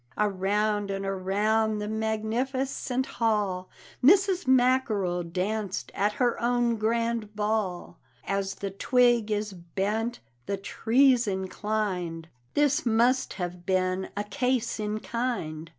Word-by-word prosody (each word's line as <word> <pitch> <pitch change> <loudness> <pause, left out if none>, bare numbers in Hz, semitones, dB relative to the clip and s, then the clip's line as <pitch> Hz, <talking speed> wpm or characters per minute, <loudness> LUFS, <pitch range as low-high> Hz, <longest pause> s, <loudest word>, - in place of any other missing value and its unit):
Around 205 +1 0
and 195 0 -3
around 210 +3 +1
the 210 0 -3
magnificent 245 +4 -1
hall 205 -7 -1 0.3
Mrs. 375 +2 +4
Mackerel 245 -8 +3
danced 190 +3 -3
at 205 +2 +1
her 245 +1 0
own 240 -1 +2
grand 230 -1 -1
ball. 210 -4 -2 0.3
"As 195 0 -1
the 200 -1 -4
twig 240 +2 +3
is 210 -1 -1
bent 200 +6 -2 0.3
the 200 - -1
tree's 245 +4 +3
inclined;" 190 -4 -2 0.3
This 290 +2 +3
must 240 +3 +2
have 180 -1 -5
been 185 0 0
a 205 - 0
case 250 0 -1
in 215 0 -2
kind. 165 -11 -3
215 Hz, 115 wpm, -27 LUFS, 195-240 Hz, 0.3 s, Mrs